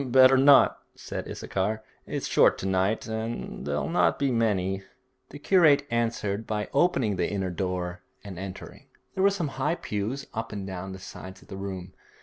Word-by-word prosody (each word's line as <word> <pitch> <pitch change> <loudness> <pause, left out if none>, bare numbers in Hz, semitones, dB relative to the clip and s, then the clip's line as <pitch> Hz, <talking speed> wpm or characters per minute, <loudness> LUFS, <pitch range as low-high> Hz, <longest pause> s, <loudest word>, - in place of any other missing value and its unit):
'Better 130 +1 +6
not,' 135 -2 +6 0.2
said - - -6
Issachar; 105 +3 -2 0.2
'it's - - -3
short - - +4
to - - -6
night, 95 +3 +1
and 110 -6 -5
there'll 75 +1 -1
not 175 - +2
be 140 -2 +1
many.' 100 -5 +1 0.5
The - - -9
curate 145 -3 +4
answered 115 -3 -1
by 105 -1 -2
opening 135 - +2
the - - 0
inner 95 -3 -2
door 90 0 -3 0.2
and 95 -4 -8
entering. 95 -1 -8 0.3
There 190 - -2
were 200 - +6
some 185 -7 -2
high 150 +5 +2
pews 110 +2 -3
up 115 +1 -4
and 100 -2 -5
down 95 0 -6
the - - -7
sides 95 0 -10
of - - -23
the 95 - -6
room. 95 -2 -6
105 Hz, 175 wpm, -27 LUFS, 95-130 Hz, 0.5 s, Better